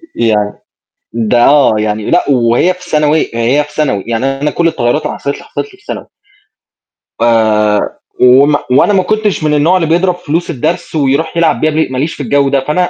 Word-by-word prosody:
يعني 105 Hz, -3 st, 0 dB, 0.6 s
ده 120 Hz, +1 st, +1 dB
آه، 145 Hz, -5 st, +4 dB
يعني 105 Hz, 0 st, -2 dB
لأ 175 Hz, -, +2 dB
وهي 125 Hz, +7 st, +2 dB
في 180 Hz, -1 st, -14 dB
ثانوي 150 Hz, 0 st, +1 dB
هي 120 Hz, +6 st, +1 dB
في 145 Hz, -, -15 dB
ثانوي، 130 Hz, -11 st, -1 dB
يعني 115 Hz, +3 st, -1 dB
أنا 150 Hz, +1 st, 0 dB
كلّ 170 Hz, +2 st, 0 dB
التغيّرات 150 Hz, -2 st, -1 dB
اللي -, -, -4 dB
حصلِت 140 Hz, -, -4 dB
لي، -, -, -13 dB
حصلِت -, -, -4 dB
لي 385 Hz, -3 st, -19 dB
في 410 Hz, -, -26 dB
ثانوي. -, -, -6 dB, 1.2 s
آآ 110 Hz, -3 st, +2 dB, 0.4 s
وما 135 Hz, +4 st, +5 dB
وأنا 140 Hz, +10 st, +3 dB
ما 190 Hz, -2 st, +2 dB
كنتش 215 Hz, -3 st, -1 dB
من 150 Hz, -1 st, +1 dB
النوع 155 Hz, +5 st, +3 dB
اللي 165 Hz, -3 st, -1 dB
بيضرب 175 Hz, +3 st, +1 dB
فلوس 170 Hz, -1 st, -3 dB
الدرس 170 Hz, +4 st, -3 dB
ويروح 150 Hz, +3 st, 0 dB
يلعب 165 Hz, -2 st, +1 dB
بيها 155 Hz, -, +2 dB
ب 155 Hz, -3 st, -1 dB
ما 130 Hz, -, -4 dB
ليش 150 Hz, +5 st, -2 dB
في 145 Hz, -, -7 dB
الجو 140 Hz, +2 st, +1 dB
ده، 140 Hz, 0 st, +1 dB
فأنا 180 Hz, +4 st, 0 dB
145 Hz, 200 wpm, -12 LUFS, 120-170 Hz, 1.2 s, وما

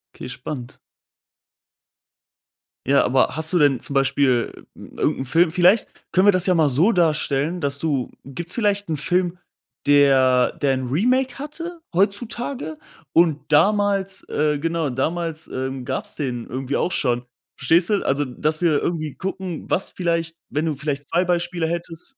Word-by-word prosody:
Okay, 125 Hz, -, -8 dB
spannend. 125 Hz, 0 st, -7 dB, 2.1 s
Ja, 140 Hz, +1 st, +4 dB
aber 130 Hz, +1 st, +3 dB
hast 160 Hz, +1 st, -1 dB
du 180 Hz, -, +2 dB
denn 145 Hz, -5 st, +4 dB
zum 140 Hz, -, -5 dB
Beispiel 135 Hz, -3 st, +1 dB
irgend -, -, -2 dB
'n -, -, -4 dB
Film 165 Hz, +5 st, +3 dB
vielleicht 180 Hz, +5 st, +4 dB, 0.2 s
können 185 Hz, +2 st, +3 dB
wir -, -, +9 dB
das 185 Hz, -2 st, +1 dB
ja 185 Hz, -, +4 dB
mal 160 Hz, -4 st, +3 dB
so 165 Hz, -, +3 dB
darstellen, 160 Hz, -1 st, +1 dB
dass 140 Hz, -2 st, -1 dB
du 140 Hz, -5 st, -1 dB
gibt's 170 Hz, +6 st, -6 dB
vielleicht 205 Hz, -5 st, 0 dB
'n 155 Hz, -, -1 dB
Film, 180 Hz, +3 st, 0 dB, 0.5 s
der 135 Hz, -3 st, +5 dB
der 135 Hz, -2 st, +3 dB
'n 130 Hz, -, -4 dB
Remake 250 Hz, -, +1 dB
hatte 330 Hz, +4 st, -7 dB
heutzutage 200 Hz, -, -1 dB, 0.3 s
und 160 Hz, -3 st, +2 dB
damals 200 Hz, +3 st, +2 dB
äh, 150 Hz, -1 st, 0 dB
genau, 165 Hz, -3 st, -1 dB
damals, 165 Hz, +4 st, -2 dB
ähm, 130 Hz, 0 st, -4 dB
gab's 130 Hz, +1 st, -4 dB
den 125 Hz, -5 st, -4 dB
irgendwie 130 Hz, +2 st, -3 dB
auch 180 Hz, -, 0 dB
schon. 120 Hz, -2 st, 0 dB, 0.3 s
Verstehst 165 Hz, +7 st, +3 dB
du? 205 Hz, -2 st, +1 dB
Also, 140 Hz, +2 st, +1 dB
dass 155 Hz, +5 st, -2 dB
wir 155 Hz, -4 st, +3 dB
irgendwie 155 Hz, -5 st, -2 dB
gucken, 190 Hz, -3 st, -5 dB
was 190 Hz, -, 0 dB
vielleicht 165 Hz, -2 st, -2 dB
wenn 150 Hz, +3 st, -1 dB
du 155 Hz, -, -1 dB
vielleicht 145 Hz, 0 st, -4 dB
2 175 Hz, +2 st, +2 dB
Beispiele 175 Hz, -1 st, -1 dB
hättest 170 Hz, -, -5 dB
160 Hz, 155 wpm, -22 LUFS, 140-180 Hz, 2.1 s, wir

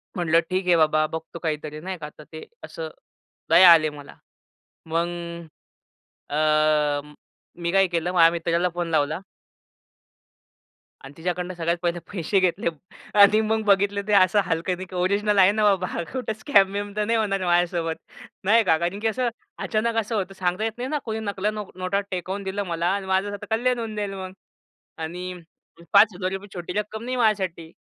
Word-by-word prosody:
म्हटलं 165 Hz, -2 st, +3 dB
ठीक 185 Hz, 0 st, -1 dB
आहे 175 Hz, -, +5 dB
बाबा 155 Hz, -1 st, +3 dB
बघतो 160 Hz, +1 st, -7 dB
काहीतरी 155 Hz, -1 st, -4 dB
नाही 185 Hz, +1 st, -5 dB
का 150 Hz, -2 st, -7 dB
तर 150 Hz, -, -11 dB
ते 160 Hz, -, -8 dB, 0.2 s
असं, 160 Hz, -1 st, -6 dB, 0.6 s
दया 175 Hz, +1 st, +9 dB
आली 155 Hz, -2 st, +5 dB
मला. 140 Hz, -, -12 dB, 0.7 s
मग 165 Hz, +1 st, 0 dB, 1.2 s
अ, 150 Hz, -1 st, +2 dB, 0.6 s
मी 170 Hz, -, 0 dB
काय 195 Hz, 0 st, +5 dB
केलं 175 Hz, 0 st, -2 dB
माझ्या 165 Hz, -2 st, +6 dB
मित्राला 170 Hz, +1 st, 0 dB
फोन 175 Hz, -1 st, -2 dB
लावला. 155 Hz, +1 st, +1 dB, 1.9 s
आणि 135 Hz, +1 st, -11 dB
तिच्याकडनं 180 Hz, +2 st, -3 dB
सगळ्यात 170 Hz, 0 st, -1 dB
पहिले 175 Hz, 0 st, -1 dB
पैसे 190 Hz, +1 st, 0 dB
घेतले 180 Hz, -2 st, 0 dB, 0.5 s
आणि 210 Hz, +2 st, +7 dB
मग 220 Hz, 0 st, 0 dB
बघितलं 200 Hz, 0 st, +3 dB
ते 210 Hz, -, +1 dB
असं 200 Hz, +1 st, +5 dB
हलक्यानी 180 Hz, +3 st, -2 dB
की 185 Hz, -, -9 dB
ओरिजनल 200 Hz, +3 st, +1 dB
आहे 190 Hz, +1 st, +7 dB
ना 215 Hz, 0 st, 0 dB
बाबा 190 Hz, -3 st, +3 dB
हा -, -, -3 dB
कुठे 250 Hz, -4 st, -3 dB
स्कॅम-बिम 205 Hz, -3 st, +2 dB
तर 210 Hz, -, 0 dB
नाही 230 Hz, +1 st, +1 dB
होणार 195 Hz, -3 st, 0 dB
माझ्यासोबत, 175 Hz, -2 st, +1 dB, 0.5 s
नाही 225 Hz, +4 st, +4 dB
का. 160 Hz, -4 st, +3 dB
कारण 175 Hz, +5 st, -2 dB
की 225 Hz, -, 0 dB
असं 245 Hz, +2 st, 0 dB, 0.3 s
अचानक 225 Hz, +1 st, 0 dB
असं 220 Hz, +2 st, -4 dB
होतं 195 Hz, -2 st, -2 dB
सांगता 180 Hz, +3 st, 0 dB
येत 225 Hz, -, 0 dB
नाही 250 Hz, +2 st, -4 dB
ना 300 Hz, -, 0 dB
कोणी 220 Hz, -1 st, -3 dB
नकला 205 Hz, -1 st, -2 dB
नो 210 Hz, -1 st, -5 dB
नोटा 185 Hz, +2 st, -1 dB
टेकवून 185 Hz, +2 st, -4 dB
दिलं 195 Hz, +1 st, -3 dB
मला 170 Hz, 0 st, -1 dB
आणि 200 Hz, -, -4 dB
माझं 190 Hz, +2 st, +1 dB
आता 205 Hz, -, -7 dB
कल्याण 250 Hz, +2 st, +1 dB
होऊन 220 Hz, -2 st, -5 dB
जाईल 205 Hz, -2 st, -3 dB
मग 190 Hz, -1 st, -6 dB, 0.7 s
आणि 180 Hz, +3 st, -5 dB, 0.6 s
5 200 Hz, -1 st, +6 dB
गरीबा 190 Hz, +2 st, -3 dB
छोटी 175 Hz, -1 st, -6 dB
रक्कम 215 Hz, +1 st, -5 dB
नाही 255 Hz, +1 st, -3 dB
माझ्यासाठी. 190 Hz, -8 st, 0 dB
185 Hz, 170 wpm, -24 LUFS, 170-205 Hz, 1.9 s, दया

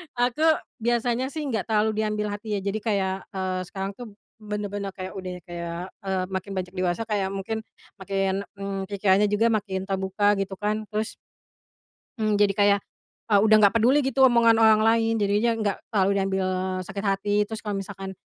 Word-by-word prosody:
Aku 245 Hz, +5 st, +1 dB, 0.3 s
biasanya 240 Hz, +1 st, 0 dB
sih 310 Hz, -, -3 dB
nggak 220 Hz, -5 st, -1 dB
terlalu 215 Hz, -1 st, +1 dB
diambil 210 Hz, 0 st, -1 dB
hati 205 Hz, +1 st, -5 dB
ya, 205 Hz, -, 0 dB
jadi 200 Hz, +2 st, -2 dB
kayak, 195 Hz, -3 st, +1 dB, 0.2 s
eee, 185 Hz, -1 st, -2 dB
sekarang 195 Hz, +2 st, -5 dB
tuh 235 Hz, -4 st, -9 dB, 0.3 s
bener-bener 205 Hz, -1 st, -4 dB
kayak 185 Hz, 0 st, -7 dB
udah 185 Hz, -1 st, -5 dB, 0.2 s
kayak, 170 Hz, -1 st, -5 dB, 0.3 s
eee, 190 Hz, -1 st, 0 dB
makin 190 Hz, +1 st, -4 dB
beranjak 185 Hz, -1 st, -4 dB
dewasa, 180 Hz, +2 st, 0 dB
kayak 195 Hz, -2 st, 0 dB
mungkin 195 Hz, +3 st, -3 dB, 0.4 s
makin, 195 Hz, 0 st, -1 dB
mmm, 195 Hz, -1 st, -4 dB
pikirannya 200 Hz, 0 st, +2 dB
juga 210 Hz, +3 st, +2 dB
makin 200 Hz, -4 st, -1 dB
terbuka 195 Hz, +2 st, +1 dB
gitu 195 Hz, 0 st, -2 dB
kan, 215 Hz, +1 st, -1 dB
terus 215 Hz, +1 st, -3 dB, 1.0 s
Mmm, 215 Hz, -1 st, +1 dB
jadi 205 Hz, 0 st, +4 dB
kayak, 200 Hz, 0 st, +5 dB, 0.5 s
eee, 205 Hz, -, +6 dB
udah 215 Hz, -, +6 dB
nggak 205 Hz, +1 st, +5 dB
peduli 260 Hz, +6 st, +4 dB
gitu 265 Hz, 0 st, +4 dB
omongan 235 Hz, -2 st, +5 dB
orang 220 Hz, -1 st, +6 dB
lain, 225 Hz, 0 st, +3 dB
jadinya 205 Hz, +3 st, +2 dB
enggak 215 Hz, -3 st, -1 dB
terlalu 195 Hz, -3 st, +2 dB
diambil 190 Hz, -1 st, 0 dB, 0.4 s
sakit 195 Hz, +3 st, -6 dB
hati. 195 Hz, +1 st, 0 dB, 0.2 s
Terus 220 Hz, 0 st, -6 dB
kalau 205 Hz, -2 st, -2 dB
misalkan 195 Hz, -1 st, -6 dB
205 Hz, 170 wpm, -25 LUFS, 195-220 Hz, 1.0 s, eee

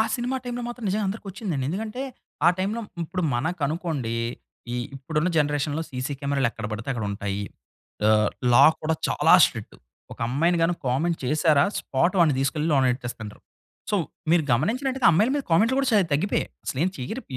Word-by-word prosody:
Cinema 250 Hz, +1 st, -2 dB
టైమ్‌లో 245 Hz, -1 st, -4 dB
మాత్రం 240 Hz, -1 st, -7 dB
నిజంగా 205 Hz, +2 st, 0 dB
అందరికొచ్చిందండి. 195 Hz, -, -4 dB
ఎందుకంటే 215 Hz, -, -4 dB, 0.4 s
ఆ -, -, +9 dB
టైమ్‌లో 205 Hz, +5 st, -1 dB, 0.2 s
ఇప్పుడు 180 Hz, +3 st, -3 dB
మనకనుకోండి, 150 Hz, -3 st, -2 dB, 0.6 s
ఈ -, -, -1 dB, 0.2 s
ఇప్పుడున్న 155 Hz, +5 st, -1 dB
జనరేషన్‌లో 145 Hz, +1 st, 0 dB
సీసీ 130 Hz, +2 st, -3 dB
కెమెరాలెక్కడ 135 Hz, -6 st, -1 dB
పడితే 110 Hz, +3 st, -5 dB
అక్కడుంటాయి. 100 Hz, -3 st, -3 dB, 0.7 s
ఆహ్, 105 Hz, -1 st, +4 dB, 0.2 s
లా -, -, +8 dB, 0.2 s
కూడా 160 Hz, +1 st, +1 dB
చాలా -, -, +4 dB
స్ట్రిక్ట్. -, -, -8 dB, 0.4 s
ఒక -, -, -12 dB
అమ్మాయిని 165 Hz, +7 st, +2 dB
గాని 170 Hz, +1 st, +2 dB
కామెంట్ 160 Hz, +7 st, 0 dB
చేశారా, 150 Hz, +1 st, +3 dB, 0.2 s
స్పాట్ 170 Hz, +8 st, 0 dB
వాడిని 165 Hz, -5 st, +4 dB
తీసుకెళ్లి 150 Hz, +3 st, 0 dB
లోన 135 Hz, -2 st, +4 dB
ఎట్టేస్తండ్రు. 120 Hz, -4 st, -8 dB, 0.5 s
సో, 210 Hz, -, +2 dB, 0.3 s
మీరు 170 Hz, -1 st, +4 dB
గమనించినట్టయితే, 255 Hz, -, +1 dB
అమ్మాయిల 210 Hz, +10 st, +3 dB
మీద 285 Hz, -, -1 dB
కామెంట్‌లు 220 Hz, +10 st, +3 dB
గూడా 275 Hz, -1 st, +1 dB
చాలా 205 Hz, -4 st, +4 dB
తగ్గిపోయాయి. 185 Hz, +8 st, 0 dB, 0.2 s
అసలేం 160 Hz, +8 st, 0 dB
చెయ్యరిప్ 145 Hz, -, -6 dB
160 Hz, 150 wpm, -25 LUFS, 130-200 Hz, 0.7 s, ఆ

